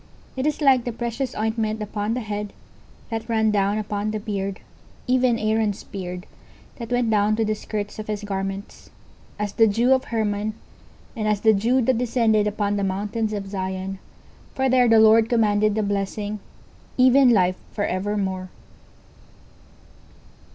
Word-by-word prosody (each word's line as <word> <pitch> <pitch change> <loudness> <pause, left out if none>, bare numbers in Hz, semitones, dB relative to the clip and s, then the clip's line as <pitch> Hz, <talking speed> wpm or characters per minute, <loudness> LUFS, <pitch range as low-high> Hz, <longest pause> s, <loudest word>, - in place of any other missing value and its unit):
19:133:002 - - -29
It 265 - +1
is 305 0 -1
like 265 -4 +5
the 240 - -3
precious 240 +3 -4
ointment 220 0 -1
upon 210 +1 -2
the 250 - -2
head, 210 -1 -5 0.6
that 225 +1 -4
ran 220 -1 +2
down 200 0 +1
upon 210 0 -2
the 215 0 -2
beard, 200 -2 -4 0.5
even 250 -2 +2
Aaron's 215 -2 0
beard: 180 -1 -7 0.5
that 235 -2 -7
went 245 -2 +1
down 210 0 +3
to 225 0 0
the 215 - 0
skirts 210 0 -5
of 215 - -6
his 210 -1 -3
garments; 195 0 -5 0.5
19:133:003 210 - 0
As 205 - -7
the 225 +1 +5
dew 235 +5 +3
of 260 0 +2
Hermon, 215 -1 -1 0.6
and 215 -3 -2
as 210 -1 +1
the 220 -1 +5
dew 240 +6 +2
that 245 0 +2
descended 225 -3 +2
upon 205 -1 -1
the 200 - -1
mountains 205 +3 -2
of 200 -2 -4
Zion: 190 0 -4 0.6
for 265 0 +1
there 250 -1 +4
the 225 -1 +6
LORD 220 +1 +6
commanded 215 -3 +2
the 215 - 0
blessing, 205 +1 -2 0.6
even 260 +1 +6
life 185 -5 +3
for 205 - -2
evermore. 190 -1 -2
215 Hz, 165 wpm, -23 LUFS, 205-230 Hz, 0.6 s, the